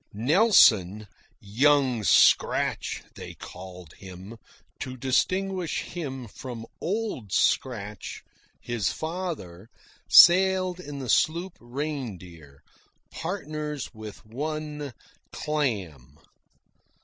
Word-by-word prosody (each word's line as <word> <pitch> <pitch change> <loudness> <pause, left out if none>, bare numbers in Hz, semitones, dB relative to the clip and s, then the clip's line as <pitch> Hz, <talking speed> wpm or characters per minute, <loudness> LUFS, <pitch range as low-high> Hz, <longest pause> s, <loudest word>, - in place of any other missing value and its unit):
Nelson, 110 - +4 0.3
"Young 130 +2 +2
Scratch" 90 - +3
they - - -9
called 90 -3 -11
him, 95 +3 -11 0.4
to 130 0 -6
distinguish 185 +8 0
him 135 -8 -6
from 115 +1 -8 0.2
"Old 195 - -3
Scratch," 105 -4 -1 0.4
his 115 -6 -2
father, 160 - -6 0.4
sailed 185 0 +6
in 145 -5 -8
the 135 -2 -6
sloop 170 - +1
Reindeer, 110 - -7 0.5
partners 155 -5 -5
with 110 0 -10
one 150 +2 -5 0.4
"Clam." 105 - -3
130 Hz, 80 wpm, -26 LUFS, 105-155 Hz, 0.5 s, sailed